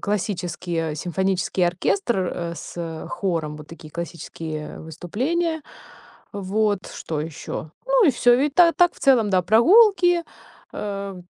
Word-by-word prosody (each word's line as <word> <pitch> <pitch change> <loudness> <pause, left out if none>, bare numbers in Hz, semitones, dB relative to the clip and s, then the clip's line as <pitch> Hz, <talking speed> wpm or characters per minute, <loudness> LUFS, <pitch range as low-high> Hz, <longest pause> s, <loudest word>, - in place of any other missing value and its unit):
классические 175 -5 -2
симфонический 185 +2 0
оркестр, 235 - 0 0.2
э, 170 -1 -4
с, 165 -2 -7
хором. 165 -6 -2
Вот 150 -1 -11
такие 165 -2 -12
классические 160 -2 -6
выступления. 265 - -2 0.7
Вот. 205 +1 0
Что 155 -2 -4
еще? 155 0 -6 0.2
Ну - - +4
и - - +6
всё, 245 0 +4
в - - 0
и 290 +1 +2
та 335 +3 +5
так 350 0 +4
в - - -17
целом, 240 -6 +4
да, 185 -2 +3
прогулки, 350 - +5 0.5
а, 200 -2 -5
195 Hz, 135 wpm, -23 LUFS, 165-265 Hz, 0.7 s, и